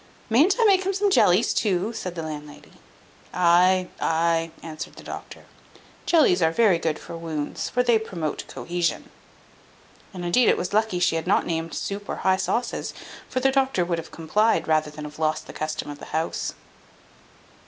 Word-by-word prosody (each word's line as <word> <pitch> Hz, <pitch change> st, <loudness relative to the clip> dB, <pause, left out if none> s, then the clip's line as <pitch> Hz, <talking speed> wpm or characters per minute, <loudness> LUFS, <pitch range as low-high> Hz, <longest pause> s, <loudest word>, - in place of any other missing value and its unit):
"Mayn't 305 Hz, -, +5 dB
I -, -, +5 dB
make 385 Hz, -3 st, +5 dB
him 390 Hz, +1 st, 0 dB
some 400 Hz, +1 st, +1 dB
jellies 190 Hz, -, +4 dB
too?" 205 Hz, +1 st, 0 dB
said 180 Hz, -5 st, -5 dB
the 165 Hz, -, -4 dB
landlady. 150 Hz, -1 st, -8 dB, 0.6 s
"Ay, 180 Hz, +1 st, +4 dB
ay," 165 Hz, 0 st, +1 dB
answered 155 Hz, -1 st, -7 dB
the -, -, -12 dB
doctor, -, -, -9 dB, 0.6 s
"jellies 285 Hz, -, +4 dB
are 160 Hz, -1 st, +3 dB
very 190 Hz, -2 st, +3 dB
good 160 Hz, -2 st, -1 dB
for -, -, -9 dB
wounds, 160 Hz, -3 st, -4 dB
for 250 Hz, -, +1 dB
they 235 Hz, -2 st, +4 dB
promote 170 Hz, -8 st, -4 dB
cohesion." 175 Hz, -1 st, -3 dB, 1.0 s
And 180 Hz, -2 st, -6 dB
indeed 230 Hz, +8 st, +4 dB
it -, -, +3 dB
was 180 Hz, -, -3 dB
lucky 215 Hz, -3 st, +1 dB
she 175 Hz, -2 st, +2 dB
had 160 Hz, -, -4 dB
not -, -, +3 dB
named 165 Hz, 0 st, -3 dB
soup 200 Hz, +1 st, -5 dB
or -, -, -2 dB
high 190 Hz, 0 st, +4 dB
sauces, 240 Hz, +5 st, -2 dB, 0.3 s
for 255 Hz, -, -1 dB
the 270 Hz, -, +3 dB
doctor 265 Hz, -9 st, +1 dB
would 170 Hz, -1 st, -1 dB
have 165 Hz, -, -9 dB
complied, 210 Hz, +8 st, +1 dB
rather 155 Hz, -1 st, +2 dB
than 150 Hz, 0 st, -9 dB
have 150 Hz, +1 st, -10 dB
lost 155 Hz, 0 st, 0 dB
the -, -, -10 dB
custom 155 Hz, -1 st, -4 dB
of 145 Hz, -, -10 dB
the -, -, -9 dB
house. 160 Hz, +1 st, -3 dB
175 Hz, 180 wpm, -24 LUFS, 160-220 Hz, 1.0 s, Mayn't